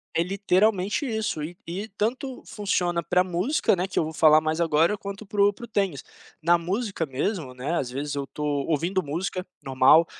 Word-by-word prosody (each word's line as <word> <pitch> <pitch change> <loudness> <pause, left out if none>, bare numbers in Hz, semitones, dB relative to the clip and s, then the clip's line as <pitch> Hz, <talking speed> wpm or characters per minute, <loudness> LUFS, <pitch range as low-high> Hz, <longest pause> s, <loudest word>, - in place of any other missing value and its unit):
É 165 - +3
literalmente 195 +5 +1
isso, 220 -9 -2
e 170 +3 -7
e 190 +6 -4
tanto 255 +4 -2
funciona 180 -5 -1
pra 180 +2 +2
música, 185 - +1
né, 180 +1 -1
que 190 - -7
eu - - +4
vou 160 +1 -5
falar 155 0 +6
mais 155 +1 -1
agora, 165 +4 +3
quanto 200 0 -7
para 200 0 -1
o 205 - +6
para 220 +4 -10
o - - -16
tênis. 200 -4 -1 0.4
Na 170 +2 +5
música 190 +2 -2
mesmo, 145 0 -3
né, 135 +6 -3
às 125 - -3
vezes 140 +3 -4
eu 140 -1 -3
tô 150 - -6 0.2
ouvindo 170 +5 +1
música, 180 +4 -3 0.2
normal, 135 +5 +5
180 Hz, 195 wpm, -25 LUFS, 155-200 Hz, 0.4 s, falar